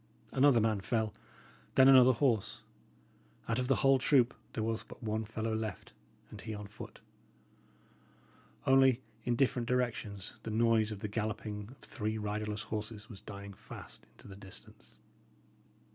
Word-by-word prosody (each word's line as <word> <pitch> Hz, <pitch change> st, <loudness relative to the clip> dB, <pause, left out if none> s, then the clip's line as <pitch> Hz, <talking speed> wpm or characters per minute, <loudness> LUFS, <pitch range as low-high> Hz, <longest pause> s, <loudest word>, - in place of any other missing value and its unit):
Another 135 Hz, -2 st, +5 dB
man 110 Hz, -2 st, +1 dB
fell; 110 Hz, 0 st, 0 dB, 0.6 s
then 130 Hz, 0 st, +8 dB
another 130 Hz, -1 st, +8 dB
horse; 115 Hz, -5 st, 0 dB, 0.8 s
out 115 Hz, +2 st, +1 dB
of 125 Hz, -, -1 dB
the 135 Hz, -, +4 dB
whole 135 Hz, -1 st, +6 dB
troop 130 Hz, -2 st, +4 dB, 0.2 s
there 110 Hz, -, -2 dB
was 115 Hz, 0 st, -1 dB
but -, -, -13 dB
one 110 Hz, 0 st, -1 dB
fellow 110 Hz, +1 st, -3 dB
left, 110 Hz, -5 st, -4 dB, 0.4 s
and -, -, -9 dB
he 110 Hz, -1 st, -5 dB
on 105 Hz, 0 st, -7 dB
foot; 100 Hz, -, -10 dB, 1.6 s
only, 135 Hz, -1 st, +5 dB, 0.2 s
in 120 Hz, -1 st, +2 dB
different 125 Hz, -2 st, +1 dB
directions, 115 Hz, -5 st, -1 dB
the -, -, -6 dB
noise 110 Hz, 0 st, +3 dB
of 100 Hz, -2 st, -6 dB
the -, -, -2 dB
galloping 105 Hz, -1 st, -3 dB
of 130 Hz, -, -14 dB
three 110 Hz, +1 st, -2 dB
riderless 105 Hz, 0 st, -3 dB
horses 110 Hz, 0 st, -5 dB
was 95 Hz, -, -10 dB
dying 100 Hz, -1 st, -8 dB
fast -, -, -10 dB
into -, -, -15 dB
the 100 Hz, -, -9 dB
distance. 100 Hz, -1 st, -11 dB
110 Hz, 150 wpm, -33 LUFS, 105-125 Hz, 1.6 s, then